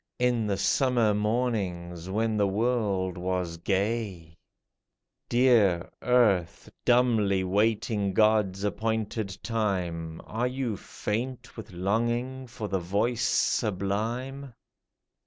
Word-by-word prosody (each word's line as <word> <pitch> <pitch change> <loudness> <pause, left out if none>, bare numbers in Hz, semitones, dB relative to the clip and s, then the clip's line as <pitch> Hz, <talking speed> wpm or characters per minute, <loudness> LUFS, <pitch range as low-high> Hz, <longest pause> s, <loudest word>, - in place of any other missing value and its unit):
In 120 -3 +1
the 100 -2 0
summer 120 0 +2
mornings 100 -6 -2
when 110 +3 0
the 105 -1 +2
world 100 -4 0
was 90 -2 -2
gay? 95 -3 -2 0.9
Dear 110 -8 +3
Earth, 110 -9 +2
dumbly 115 -6 +3
waiting 105 0 +1
God's 105 -3 +3
appointed 110 -2 -2
time, 90 -8 -2
Are 115 +3 -1
you 125 -3 -2
faint 125 +6 -4
with 110 -3 -9
longing 120 +8 -1
for 110 -2 -6
the 95 -1 -1
voice 105 +7 0
sublime 115 +6 -1
105 Hz, 100 wpm, -27 LUFS, 95-120 Hz, 0.9 s, Dear